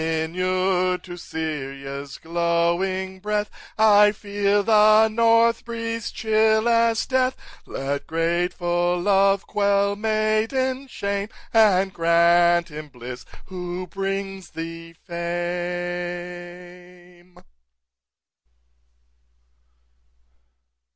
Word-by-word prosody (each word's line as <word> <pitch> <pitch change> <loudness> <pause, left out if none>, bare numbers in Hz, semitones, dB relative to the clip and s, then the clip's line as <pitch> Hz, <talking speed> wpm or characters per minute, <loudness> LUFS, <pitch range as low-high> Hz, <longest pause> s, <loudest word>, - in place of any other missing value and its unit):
Inured 180 +3 0
to 180 -1 -8
Syria's 140 -4 -6
glowing 170 +3 -1
breath, 210 +1 -2 0.3
I 210 -1 +6
feel 205 -1 0
the 215 0 +5
north 230 +1 +3
breeze 230 0 -4
chill 220 0 +2
as 230 -1 +2
death; 260 0 +1 0.3
Let 140 +1 -4
grateful 175 +1 0
love 195 +1 +2
quell 200 0 +1
maiden 220 +5 0
shame, 200 -3 -3 0.2
And 195 -4 +4
grant 170 +1 +3
him 150 0 -8
bliss 125 -2 -9 0.2
who 180 0 -6
brings 195 0 -4
thee 165 0 -8
fame." 175 +1 -6
185 Hz, 75 wpm, -23 LUFS, 170-210 Hz, 0.3 s, I